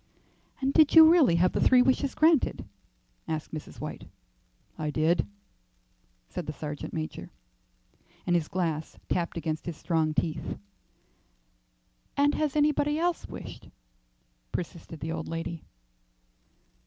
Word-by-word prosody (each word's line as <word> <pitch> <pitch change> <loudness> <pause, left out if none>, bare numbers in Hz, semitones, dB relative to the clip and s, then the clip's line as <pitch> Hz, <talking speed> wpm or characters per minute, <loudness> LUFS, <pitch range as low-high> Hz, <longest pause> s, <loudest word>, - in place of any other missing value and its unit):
"And 270 +1 +1
did 310 -1 +5
you 320 -1 +11
really 310 - +5
have 180 +2 +3
the - - -1
three 250 -1 +6
wishes 260 +1 +1
granted?" 315 -2 +3 0.6
asked 155 -1 -4
Mrs. 155 - -7
White. - - -7 0.7
"I 155 -1 -3
did," 160 +3 +1 1.0
said 170 - -6
the 150 - -3
sergeant 150 0 -6
major, 155 -1 -5 1.0
and 175 - +2
his 165 -3 +1
glass 165 -4 -2
tapped 175 -1 -1
against 155 0 -3
his 170 -3 -4
strong 160 -3 0
teeth. 155 +1 -2 1.6
"And 285 +1 +4
has 305 -2 -1
anybody 295 0 +2
else 345 +1 -1
wished?" - - -9 0.8
persisted 165 -2 -6
the 160 - -3
old 160 -1 -4
lady. 165 0 -4
170 Hz, 125 wpm, -28 LUFS, -, 1.6 s, you